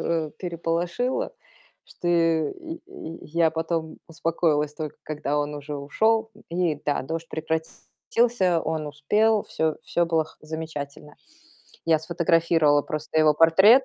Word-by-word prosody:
э, 160 -2 -1
переполошило, 175 - -1 0.5
что 175 - -5
и 170 - +1
и 170 - -8
я 165 +1 +2
потом 160 0 -2
успокоилась, 160 -2 0
только 155 -2 -5
когда 150 -1 -2
он 145 0 -1
уже 145 0 -5
ушёл. 220 +10 +1 0.2
И 170 -3 +1
да, 145 - 0
дождь 165 +4 -4
прекратился. 175 +5 0
Он 160 -1 -2
успел. 210 +9 +2
Всё 160 -1 -1
всё 170 0 +1
было 165 -1 +2
х 160 - -18
замечательно. 155 -2 -6 0.7
Я 160 -1 +5
сфотографировала 165 -2 +3
просто 155 +1 -2
его 155 -1 +5
портрет. 190 - +7
160 Hz, 125 wpm, -25 LUFS, 155-175 Hz, 0.7 s, портрет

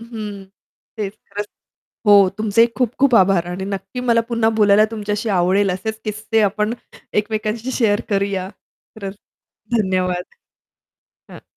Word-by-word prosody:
हं, 215 -4 -7 0.5
तेच 200 -2 -2 0.2
खरंच 205 +1 -4 0.6
हो. 200 -2 +7
तुमचेही 220 +2 +4
खूप 250 -2 0
खूप 270 -2 +4
आभार 185 -2 +4
आणि 180 +2 -4
नक्की 200 +5 -5
मला 235 -2 +3
पुन्हा 230 -1 +2
बोलायला 205 +1 +6
तुमच्याशी 210 0 -3
आवडेल 190 +3 +2
असेच 220 +4 -4
किस्से 215 +1 -1
आपण 210 +3 0 0.5
एकमेकांशी 215 +3 -3
शेअर 210 -5 +2
करूया. 195 -2 -1 0.5
खरंच 200 -1 -6 0.6
धन्यवाद. 185 -3 0 1.1
हं. - - -12
210 Hz, 125 wpm, -20 LUFS, 195-220 Hz, 1.1 s, हो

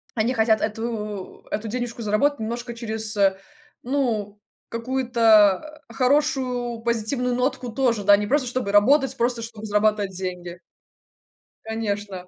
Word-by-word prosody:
они 230 +2 +1
хотят 220 -2 +2
эту 215 -3 -4
эту 220 +1 -3
денежку 240 +1 -4
заработать 230 +7 +1
немножко 235 +2 -4
через, 220 -2 -3
э, 195 -1 +3 0.5
ну, 230 -6 -1 0.3
какую-то, 230 +1 +2
э, - - -12
хорошую, 255 -3 +1
позитивную 235 +2 0
нотку 250 -1 -1
тоже, 235 -3 0
да, 205 +1 +7
не 210 - -2
просто 270 +1 +1
чтобы 245 -4 -2
работать, 265 +6 +4
просто 240 0 0
чтобы 225 -2 -7
зарабатывать 210 -1 +1
деньги. 180 -1 -6 1.0
Конечно. 205 -4 -4
230 Hz, 125 wpm, -23 LUFS, 210-250 Hz, 1.0 s, да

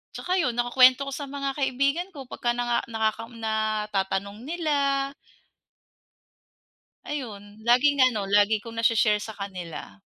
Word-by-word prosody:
tsaka 370 +1 -1
yun 250 -6 0
nakukuwento 255 +2 +5
ko 275 - -4
sa 285 - -5
mga 275 -1 -3
kaibigan 280 +6 0
ko 270 - -8
pagka 240 0 -1
naka 240 0 0
natatanong 215 -2 -2
nila. 280 -4 0 2.0
Ayun, 215 -7 -7
laging 260 +4 +4
ano, 210 -4 -3
lagi 205 +2 +4
kong 230 +1 -10
nashe-share 215 -2 +3
sa 220 - -6
kanila. 180 - -8
235 Hz, 120 wpm, -26 LUFS, 210-275 Hz, 2.0 s, nakukuwento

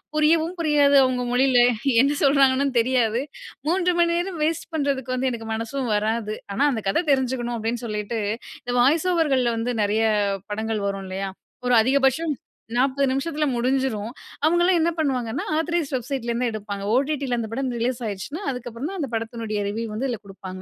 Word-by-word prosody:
புரியவும் 320 +2 +3
புரியாது 290 -3 +4
அவுங்க 255 -1 0
மொழியில, 255 0 +4 0.4
என்ன 280 +2 +2
சொல்றாங்கன்னு 275 -1 +3
தெரியாது. 240 -1 +2 0.5
3 360 0 +2
மணி 340 0 +3
நேரம் 350 -1 -3
வேஸ்ட் 320 +1 -1
பண்றதுக்கு 270 -4 -1
வந்து 260 +1 0
எனக்கு 225 -1 -6
மனசும் 230 +2 -3
வராது. 215 0 -1 0.2
ஆனா 245 +9 +2
அந்த 220 - -3
கதை 325 - +1
தெரிஞ்சுக்கணும் 250 -3 0
அப்டின்னு 230 +2 -3
சொல்லிட்டு, 210 +2 -3 0.4
இந்த 245 0 -3
வாய்ஸ் 305 +7 +3
ஓவர்கள்ள 270 -8 +2
வந்து 240 +2 -1
நிறைய 210 +2 +1 0.5
படங்கள் 220 -1 -2
வரும் 195 -1 -3
இல்லையா? 195 +1 -3 0.4
ஒரு 245 - +4
அதிகபட்சம் 275 +5 +2 0.4
40 275 +2 +2
நிமிஷத்துல 300 +3 -1
முடிஞ்சிரும். 245 -3 0 0.3
அவுங்களலாம் 345 +3 +4
என்ன 330 +1 +3
பண்ணுவாங்கன்னா, 255 -7 -1
ஆத்தரைஸ்ட் 325 -3 -1
வெப்சைட்லேருந்து 245 -1 -2
எடுப்பாங்க. 205 -2 -5
ஓடிட்டில 275 -2 0
அந்த 225 - -3
படம் 260 +2 -2
ரிலீஸ் 245 +1 -1
ஆயிருச்சுனா, 215 - -5
அதுக்கப்புறம் 245 +1 -5
தான் 390 - -6
அந்த 280 -5 -2
படத்தினுடைய 225 -2 -3
ரிவ்யூ 225 +3 -3
வந்து 245 +6 -2
இதுல 235 -4 -3
கொடுப்பாங்க. 190 -1 -9
255 Hz, 155 wpm, -23 LUFS, 225-285 Hz, 0.5 s, புரியாது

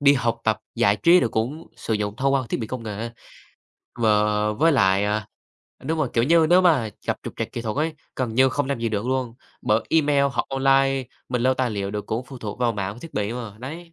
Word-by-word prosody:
đi 140 0 +6
học 120 -3 -1
tập, 110 -1 +2 0.2
giải 110 -4 +3
trí 170 - +5
rồi 120 - +1
cũng 125 +9 -2
sử 110 - -2
dụng 105 0 -2
thông 135 +2 +1
qua 135 - +2
thiết - - -2
bị 110 - -3
công 125 +1 -5
nghệ. 110 +1 -5 0.9
Và 115 - +3 0.4
với 160 +9 +3
lại, 95 -6 +3
à 105 0 -1 0.6
đúng 160 +4 -1
rồi, 155 - +1
kiểu 115 - +2
như, 165 +3 +4
nếu 180 +1 +7
mà 150 -11 +3 0.2
gặp - - 0
trục - - -7
trặc - - -4
kỹ 120 - -4
thuật 110 -2 -3
ấy, 155 +2 0 0.2
gần 125 -4 -2
như 130 +2 +5
không 145 +1 -1
làm 140 -3 -1
gì 115 - 0
được 105 +1 -2
luôn, 130 -2 -1 0.3
bởi 110 +1 +2
email 145 -3 +3
hoặc - - -1
online, 135 0 +2 0.2
mình 125 -1 -1
lưu 130 +1 +3
tài 130 -2 0
liệu 100 -2 -3
được 105 0 -5
cũng 115 +3 -2
phụ 135 -2 -10
thuộc 110 -2 -6
vào 120 -2 +1
mạng 100 -2 -3
và - - -13
thiết 165 - -10
bị 105 +1 -1
mà. 115 -4 -7
Đấy. 165 +6 -8
125 Hz, 245 wpm, -23 LUFS, 110-140 Hz, 0.9 s, nếu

